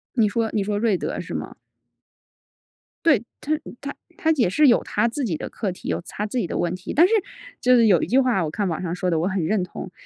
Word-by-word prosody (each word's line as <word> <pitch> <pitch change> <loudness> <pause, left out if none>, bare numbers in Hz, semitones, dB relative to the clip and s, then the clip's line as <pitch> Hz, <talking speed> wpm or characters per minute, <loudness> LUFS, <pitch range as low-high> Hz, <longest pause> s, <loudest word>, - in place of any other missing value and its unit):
你 220 -4 +3
说 225 0 0
你 210 - +1
说 205 +1 -1
瑞 215 -1 +2
德 - - -4
是 - - -6
吗？ - - -5 1.5
对。 265 -9 +4 0.2
他 300 - -4 0.3
他 280 0 -5 0.2
他 320 - +2
也 230 -8 +3
是 295 +8 +4
有 235 - +4
他 - - 0
自 270 +3 -3
己 175 -8 -1
的 - - -5
课 210 - -3
题、 - - -8
有 - - -1
他 210 - -4
自 215 +4 -4
己 195 -8 0
的 - - -3
问 175 0 0
题。 185 - -6
但 335 +4 +6
是 420 - +1 0.5
就 250 0 +4
是 230 -2 +5
有 185 -5 +5
一 - - -1
句 255 - +2
话， 250 -8 +3
我 155 - -3
看 205 +6 -2
网 165 0 -3
上 175 -1 -3
说 180 0 -1
的， 165 - +1
我 170 - 0
很 190 -3 -1
认 200 +3 +1
同。 - - -8
210 Hz, 275 characters per minute, -23 LUFS, 185-250 Hz, 1.5 s, 但